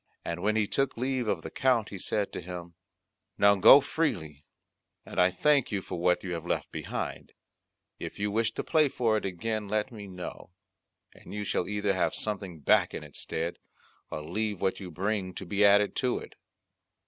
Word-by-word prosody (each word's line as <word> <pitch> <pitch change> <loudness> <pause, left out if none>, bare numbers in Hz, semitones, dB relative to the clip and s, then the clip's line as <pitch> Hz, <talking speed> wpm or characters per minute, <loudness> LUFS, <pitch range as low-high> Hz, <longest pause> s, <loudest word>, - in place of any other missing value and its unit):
And 85 +1 -3
when 105 +3 +1
he 110 -1 +3
took 135 +5 -1
leave 130 -1 -1
of 95 -6 -1
the 80 - -6
Count 125 -5 +2
he 100 - -7
said 105 +2 -1
to - - -4
him, 85 -1 -7 0.6
"Now 100 0 +6
go 100 +8 +9
freely, 80 - -2 0.6
and - - 0
I 90 - +6
thank 140 +9 +2
you 100 -3 -1
for - - -5
what 90 +1 +2
you 90 -2 -3
have 85 -2 -4
left - - -2
behind; - - -5 0.7
if - - -6
you 105 0 -1
wish 110 +1 +1
to - - -3
play 155 -2 +3
for 115 -5 +1
it 105 - -3
again 105 +3 -2
let 105 +4 -1
me 105 -3 -8
know, 90 -1 -8 0.6
and - - -11
you 105 - -2
shall 90 - -1
either 105 -1 0
have 85 -3 0
something 100 -6 -4
back - - +3
in - - -5
its - - -11
stead, 85 +2 -3 0.5
or 75 - -5
leave 105 +4 -2
what 95 0 0
you 95 -3 -7
bring 95 +2 -2
to 95 - -6
be 100 +3 +1
added 100 0 +5
to 125 -2 +1
it." - - -9
100 Hz, 195 wpm, -29 LUFS, 90-110 Hz, 0.7 s, go